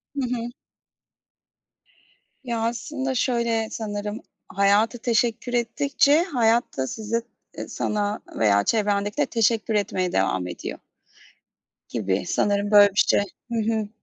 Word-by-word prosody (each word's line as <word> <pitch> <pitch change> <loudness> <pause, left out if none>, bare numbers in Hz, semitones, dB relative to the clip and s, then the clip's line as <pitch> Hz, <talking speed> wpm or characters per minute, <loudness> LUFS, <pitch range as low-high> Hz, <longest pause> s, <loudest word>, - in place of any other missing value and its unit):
Hı 280 - -1
hı. 235 0 -4 1.9
Ya 235 -3 -2
aslında 265 +3 -3
şöyle 235 -3 0
sanırım, 210 -1 -4 0.3
hayata 200 +4 +2
teşekkür 235 +1 0
ettikçe 280 +6 +2
hayat 240 - +1
da 130 0 -1
size, 225 - -2 0.3
e - - -7
sana 210 -1 -2
veya 100 -2 +3
çevrendekilere 205 - +1
teşekkür 225 -1 +1
etmeye 185 -3 0
devam 95 -1 0
ediyor. 90 - -6 1.1
Gibi 100 -4 -1
sanırım 205 0 0
böyle 205 -1 +8
bir 195 - 0
şey. - - +3 0.3
Hı - - -1 0.2
hı. 215 -2 -2
220 Hz, 115 wpm, -24 LUFS, 205-235 Hz, 1.9 s, böyle